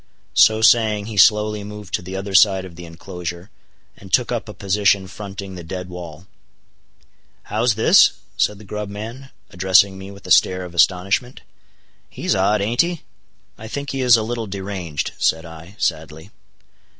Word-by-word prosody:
So 110 0 +4
saying 110 -3 +4
he 110 0 -7
slowly 105 +1 +4
moved 105 -1 -10
to - - 0
the 95 +2 -8
other 95 +1 -5
side 95 -1 +4
of 90 -2 -12
the 90 +1 -10
inclosure, 85 +2 -8 0.4
and 95 -1 -15
took 125 +3 +2
up 115 -2 -3
a - - -7
position 100 0 +1
fronting 100 0 -8
the 90 -2 -8
dead 90 +2 -7
wall. 85 -2 -9 1.2
"How's 115 +1 0
this?" 110 - +5 0.2
said 105 - 0
the 105 - -14
grub 105 0 -6
man, 115 +7 -8 0.2
addressing 95 +1 +3
me 95 +1 -9
with 100 0 -14
a - - -7
stare 90 0 +4
of 90 - -11
astonishment. 95 +8 +1 0.7
"He's - - -2
odd, 100 +2 +1
aint 115 +4 +2
he?" 170 -1 -3 0.6
"I 110 - -8
think 140 +4 -5
he 135 - -3
is 125 -2 +6
a 110 - -2
little 115 0 -4
deranged," 95 -5 -4
said 80 +1 +1
I, 80 +3 -12
sadly. 80 +1 -3
100 Hz, 170 wpm, -20 LUFS, 90-110 Hz, 1.2 s, is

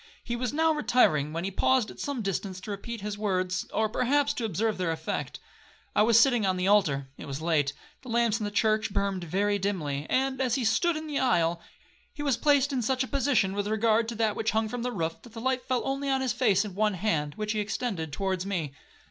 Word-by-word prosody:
He 240 - -3
was 245 0 -2
now 320 +2 +2
retiring, 155 - +2
when 165 +2 -3
he 195 - -2
paused 250 +3 +2
at - - -14
some 280 -5 -3
distance 195 -1 -3
to 210 - -6
repeat 225 +2 -6
his 205 0 -4
last - - -10
words, 185 -3 0
or 220 - +1
perhaps 270 +6 +1
to 235 - -3
observe 220 -1 -1
their 180 -3 0
effect. 160 0 -4 0.6
I - - +5
was 225 +1 +6
sitting 240 -2 +4
on 190 -1 +1
the 180 +1 0
altar,—it 145 -10 +1
was 140 0 -4
late,—the 155 - -2
lamps 230 -1 +2
in 215 - -2
the - - -1
church 215 0 +1
burned 195 -2 -1
very 200 +5 0
dimly, 155 -8 -2
and, 265 0 +1
as 250 -3 +1
he 260 -4 -1
stood 330 +9 +2
in 310 - -6
the 295 -2 -2
aisle, 170 -9 +2 0.5
he 290 - -6
was 280 -4 +2
placed 285 0 +3
in 255 - 0
such 255 +3 +1
a - - -5
position, 265 -9 +1
with 205 0 -2
regard 220 +1 +2
to 235 - -4
that 220 -1 +1
which 220 - 0
hung 220 0 +1
from 245 +2 -4
the 250 +1 -2
roof, 165 -6 -3
that 235 - -15
the 230 - -7
light 260 +1 -1
fell 255 -2 0
only 275 +1 -2
on 265 -1 +1
his 255 -2 0
face 220 -5 +2
and 200 -3 -7
one 210 0 +1
hand, 160 -7 -1
which 215 0 -2
he 215 - -1
extended 205 -6 -3
towards 190 +3 -2
me. 175 -8 -3
215 Hz, 235 wpm, -28 LUFS, 185-250 Hz, 0.6 s, was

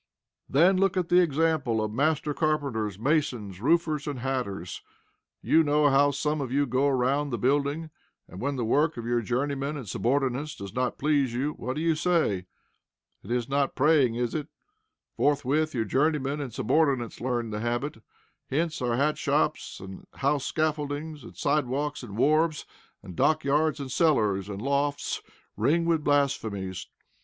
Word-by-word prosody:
Then 175 +7 +4
look 195 0 +2
at 180 -2 0
the 180 - +6
example 155 -7 +1
of 110 -1 -1
master 150 +3 +1
carpenters, 140 - -1
masons, 115 - -1
roofers, 155 +1 +1
and 145 -2 -3
hatters. 120 -10 -3 0.6
You 160 - +4
know 150 -1 +3
how 140 +1 +5
some 150 +2 -1
of 130 -3 -4
you 145 +2 +2
go 130 +2 +1
around 135 +2 +1
the 120 - -2
building, 145 +6 0 0.4
and, 90 - -10
when 140 +2 -1
the 120 -3 -2
work 150 +7 +2
of 115 - -5
your 120 0 +1
journeyman 140 +5 -2
and 130 -6 -7
subordinates 135 +6 -1
does 100 -1 -8
not 125 0 -1
please 140 -4 +1
you, 140 +4 0
what 130 -2 -5
do 155 - -2
you 165 -1 +3
say? 155 - +1 0.7
It - - -13
is 120 -1 -1
not 140 0 0
praying, 140 -4 +3
is 120 0 -1
it? 150 -2 -3 0.7
Forthwith, 145 +1 +1
your 115 -2 0
journeymen 145 +4 0
and 135 -4 -5
subordinates 135 0 0
learn 120 -2 -2
the 105 - -3
habit. 120 +2 -2 0.5
Hence 160 +2 -1
our 120 -2 0
hat 150 +3 +1
shops, - - 0
and 95 0 -10
house 140 +1 0
scaffoldings, 155 -1 -2
and - - -12
side 145 -2 +1
walks, 145 +3 -2
and 110 -5 -8
wharves, 155 +4 +2 0.4
and 90 - -10
dockyards, 155 - +2
and 135 -2 -5
cellars, 105 - +2
and 100 +1 -6
lofts 140 +1 -1 0.3
ring 165 +3 +2
with 165 -2 +1
blasphemies. 110 -11 0
140 Hz, 165 wpm, -27 LUFS, 120-150 Hz, 0.7 s, the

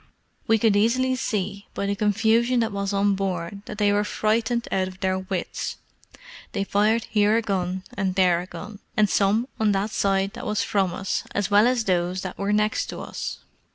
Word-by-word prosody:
We 225 - +5
could 220 -1 +3
easily 255 +5 +2
see, 200 -4 -3
by 200 - -2
the 200 0 0
confusion 225 +4 +2
that 225 - 0
was 200 0 -2
on 200 0 +2
board, 190 -1 -3
that 210 - -7
they 205 -1 +3
were 205 0 +2
frightened 225 +3 0
out 190 -1 +1
of 185 0 -10
their 190 -1 0
wits; 190 -1 -4 0.8
they 195 - 0
fired 210 +3 +2
here 210 +1 +2
a - - +2
gun 185 -2 -2
and 190 -2 -1
there 180 -3 +3
a 180 - -9
gun, 205 +1 -9 0.2
and 215 -1 +5
some 205 +5 +2
on 215 -2 +3
that 200 +2 -1
side 195 -1 +1
that - - -7
was 210 0 0
from 195 -3 +1
us, 190 +2 -2
as 205 0 0
well 205 +3 +6
as 250 -2 +1
those 180 -1 0
that 185 - -6
were 200 +1 0
next 210 +1 +1
to - - -6
us. - - -5
205 Hz, 200 wpm, -24 LUFS, 190-215 Hz, 0.8 s, well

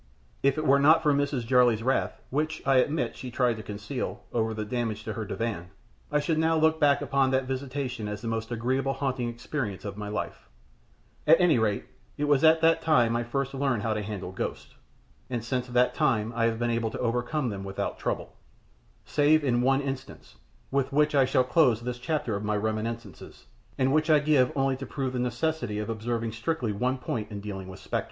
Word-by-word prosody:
If 140 +1 +2
it 155 - -1
were 140 0 +5
not 155 +3 +5
for 150 -2 +4
Mrs. 140 -3 0
Jarley's 120 -2 +4
wrath 130 +2 0
which, 155 +3 -1
I 135 -1 +4
admit, 135 -1 +1
she 125 - -7
tried 120 -2 +1
to - - -6
conceal 105 +5 -5
over 110 -1 +1
the 110 -1 -4
damage 110 -1 -2
to 110 - -4
her 110 -1 -4
divan, 105 -5 -3 0.4
I 150 - +3
should 155 +2 0
now 160 0 +3
look 160 0 +3
back 145 -2 +3
upon 135 -1 +2
that 130 0 +1
visitation 130 -3 -4
as 105 -1 -4
the - - -4
most 115 0 -3
agreeable 130 +3 0
haunting 130 -4 -2
experience 120 -4 -4
of 100 0 -5
my 105 -1 -5
life; 105 - -5 0.8
at 160 +2 +7
any 175 -8 +4
rate, 105 -2 0 0.3
it 145 - -2
was 145 -1 +3
at 160 0 +6
that 165 0 +4
time 125 -8 +3
that 120 - +1
I - - -1
first 135 +3 -2
learned 135 -6 0
how 110 - 0
to 105 - -2
handle 100 -3 -5
ghosts, 95 - -5 0.6
and 120 -3 -3
since 125 +1 -2
that 125 0 +2
time 115 -2 +1
I 115 -1 +2
have 115 -1 +1
been 120 0 0
able 115 -1 0
to - - -7
overcome 125 +3 -1
them 100 -2 -5
without 95 0 -4
trouble - - -3 0.7
save 150 +1 +3
in 120 -3 +2
one 135 +2 +3
instance, 135 -1 -6 0.4
with 140 0 0
which 150 +2 +3
I 135 -2 +5
shall 130 0 +3
close 125 -3 +3
this 120 +1 -5
chapter 125 -4 -1
of 100 - -4
my 105 0 0
reminiscences, 110 +2 -4 0.3
and 135 +1 +2
which 155 +1 +2
I 155 - +7
give 145 -4 +3
only 135 -1 +1
to 135 - -6
prove 135 -3 -3
the 125 - -2
necessity 120 -2 -1
of 105 +1 -3
observing 115 +1 -2
strictly 115 +1 -2
one 125 +6 0
point 110 -4 -4
in 105 -2 -6
dealing 100 -2 -6
with 95 0 -10
spectres. - - -2
125 Hz, 210 wpm, -27 LUFS, 110-140 Hz, 0.8 s, at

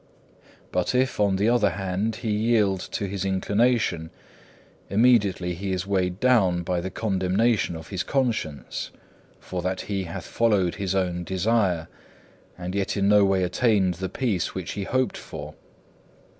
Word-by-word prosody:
2. - - -28 0.2
But 90 +7 0
if, 130 -2 +1
on 100 -2 +3
the 100 +3 +1
other 115 -4 +4
hand, 95 +4 -2
he 110 -1 -3
yield 105 -3 +2
to 100 - -1
his 100 0 -3
inclination, 100 -2 +1 0.8
immediately 100 -5 +3
he 95 +2 -3
is 95 0 -2
weighed 95 -2 0
down 100 -9 +3
by 90 0 -1
the 95 - -4
condemnation 95 0 +1
of 80 0 -9
his 95 -3 -2
conscience; 115 - -2 0.5
for 90 -1 -5
that 95 +1 -2
he 95 -1 -3
hath 85 - -6
followed 105 -7 +2
his 95 -1 -1
own 90 -2 0
desire, 95 -2 +1 0.7
and 90 0 -5
yet 100 +1 -1
in 100 0 +2
no 105 -1 +6
way 95 -1 +2
attained 95 0 +2
the 95 - -2
peace 105 -5 -1
which 95 -3 -4
he 100 -1 -4
hoped 130 +3 0
for. - - -8
95 Hz, 155 wpm, -25 LUFS, 90-110 Hz, 0.8 s, no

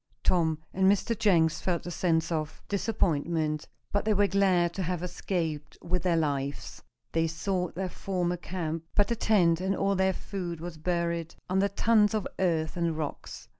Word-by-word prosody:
Tom 160 -3 +2 0.2
and 190 +1 +4
Mr. 215 +3 +1
Jenks 170 -7 +3
felt 175 -2 -1
a 175 - -4
sense 165 -1 +1
of 155 -1 -2
disappointment, 165 -7 0 0.2
but 205 - +1
they 215 -1 +2
were 205 +1 +4
glad 190 -3 +3
to 195 - -3
have 180 -1 -2
escaped 165 -4 -3
with 180 +1 0
their 170 -1 +2
lives. 140 -3 -2 0.3
They 165 0 +2
sought 180 +2 -2
their 190 +1 -2
former 180 -1 -2
camp, 165 -2 -4
but 205 -1 +3
the 235 - +1
tent 180 -7 +3
and 190 +1 0
all 195 +1 +1
their 190 0 +2
food 175 -4 -5
was 170 0 -7
buried 170 -1 -1 0.2
under 190 +2 +3
tons 210 +1 +3
of 215 - -1
earth 165 -4 +1
and 170 -2 0
rocks. 150 -2 -5
175 Hz, 170 wpm, -29 LUFS, 165-195 Hz, 0.3 s, and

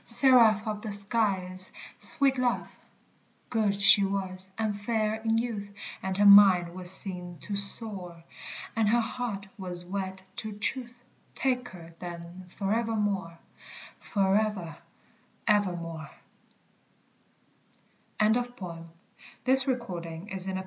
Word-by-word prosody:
Seraph 230 -4 +5
of 210 -1 -3
the 215 - -5
skies, 195 -3 +3 0.3
sweet 275 -3 +5
love! 245 -1 -1 0.8
Good 210 -4 0
she 200 0 +6
was, 190 -1 -3
and 215 -2 -1
fair 215 +1 -2
in 225 0 +1
youth; 220 -4 -3 0.3
And 190 0 -3
her 205 - +3
mind 195 -4 +7
was 180 -1 -2
seen 180 -2 -1
to 205 - -4
soar. 200 -4 -3 0.5
And 220 -2 +2
her 235 +2 +3
heart 225 -4 -4
was 180 -2 -4
wed 190 0 -5
to 215 -1 -5
truth: 240 +3 -2 0.3
Take 250 -2 -1
her, 170 -2 -13
then, 175 +1 -9
forevermore, 205 -4 -1 0.6
Forever 195 -4 -1 0.7
evermore 175 -7 -1 2.1
BRYAN 215 0 +3
WALLER 245 +1 0
PROCTER 180 -9 -9 0.6
(_Barry 260 0 +3
Cornwall. 185 -1 -6
200 Hz, 110 wpm, -28 LUFS, 185-225 Hz, 2.1 s, mind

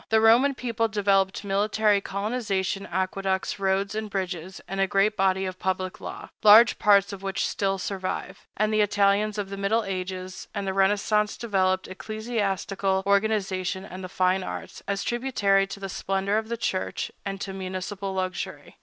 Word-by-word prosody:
The 220 - +4
Roman 240 +5 +5
people 230 -3 -1
developed 200 -2 +1
military 205 +1 +2
colonization, 200 -2 -2
aqueducts, 190 +2 -1
roads 195 +1 0
and 215 0 -3
bridges, 185 -2 -4
and 195 +1 -4
a 195 - +3
great 195 +3 +2
body 190 -1 +2
of 185 0 -5
public 185 +2 -2
law, - - -7
large 220 +3 +8
parts 200 -1 +4
of 195 - -8
which 195 -1 -1
still 195 -1 -1
survive; 190 0 -4
and 215 +1 +1
the 215 - +4
Italians 205 +1 +2
of 200 -1 -3
the 200 - -5
middle 210 +4 +1
ages 185 -1 -5
and 200 - -2
the 190 - -1
Renaissance 205 +2 +2
developed 190 -4 +1
ecclesiastical 195 -2 -2
organization 195 -2 0
and 185 +1 -8
the 185 - -6
fine 185 +1 +2
arts, 185 - -7
as 200 0 -1
tributary 205 -6 +1
to 195 +1 -8
the 195 - -4
splendor 195 +2 0
of 220 0 -8
the 235 - -2
church 185 -4 -2
and 195 -1 -4
to 195 - -4
municipal 190 +1 -4
luxury. 185 -1 -4
195 Hz, 165 wpm, -26 LUFS, 190-210 Hz, -, large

